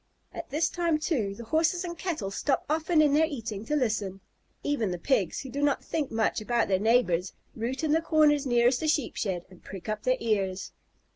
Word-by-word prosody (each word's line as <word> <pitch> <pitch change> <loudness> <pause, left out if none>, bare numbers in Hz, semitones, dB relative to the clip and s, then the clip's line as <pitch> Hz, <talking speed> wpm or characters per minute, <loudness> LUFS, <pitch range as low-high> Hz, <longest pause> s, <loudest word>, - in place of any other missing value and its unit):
At - - -7
this 310 +4 +1
time, 340 -3 0
too, 250 - -1
the 235 - -8
Horses 325 +8 +1
and 345 -1 -5
Cattle 320 - -3
stop 270 +7 0
often 315 +1 +2
in 290 -2 +3
their 315 +2 +4
eating 225 -8 -5
to 300 - -1
listen. 210 -8 -1 0.4
Even 280 -8 0
the 180 - -3
Pigs, 190 - 0
who 265 - -8
do 285 - -3
not 290 -1 +1
think 300 -4 -2
much 220 -1 0
about 235 +1 +1
their 190 -1 +2
neighbors, 200 -5 +2 0.2
root 245 +6 -3
in 310 - +1
the 320 +2 +3
corners 300 -3 +3
nearest 240 +1 +3
the 315 - -2
Sheep 300 -4 0
shed 180 -4 -2
and 180 - -17
prick 190 -1 -9
up 215 0 -2
their 255 +3 +1
ears. 195 -4 -1
255 Hz, 210 wpm, -28 LUFS, 210-305 Hz, 0.4 s, their